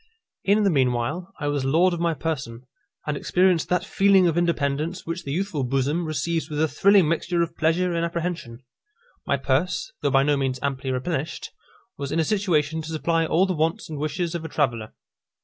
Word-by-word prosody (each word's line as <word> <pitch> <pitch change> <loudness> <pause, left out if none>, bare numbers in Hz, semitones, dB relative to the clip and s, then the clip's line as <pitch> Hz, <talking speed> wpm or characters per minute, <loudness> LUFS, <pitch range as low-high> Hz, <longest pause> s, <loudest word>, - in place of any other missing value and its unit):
In 205 +2 +3
the 200 - +3
meanwhile, 130 +6 0
I - - -4
was 145 -2 0
lord 165 +7 +3
of 170 - -3
my 170 -1 +1
person, 130 -6 -4 0.4
and 150 - -1
experienced 180 +2 +2
that 180 +1 +1
feeling 195 -2 +4
of 165 - +1
independence 165 -1 -1
which 165 +2 -4
the 140 - -4
youthful 175 -3 -1
bosom 135 +6 0
receives 160 +1 -2
with 150 -1 -3
a 160 - +3
thrilling 195 +1 +4
mixture 170 +2 0
of 170 - -6
pleasure 170 +3 +1
and 170 0 0
apprehension. 170 -8 -4 0.6
My 140 - +2
purse, 155 - -1
though - - +1
by 135 0 +4
no 145 0 +2
means 135 -1 -1
amply 135 -1 -2
replenished, 135 +4 -3 0.5
was 140 -1 -4
in 165 - 0
a - - +3
situation 160 -6 0
to 155 - -8
supply 165 +1 0
all 175 +5 +3
the 190 - -1
wants 160 0 -1
and 150 - -5
wishes 160 +3 -2
of 170 -2 -4
a 160 - -6
traveller. 120 -8 -1
160 Hz, 195 wpm, -24 LUFS, 140-175 Hz, 0.6 s, feeling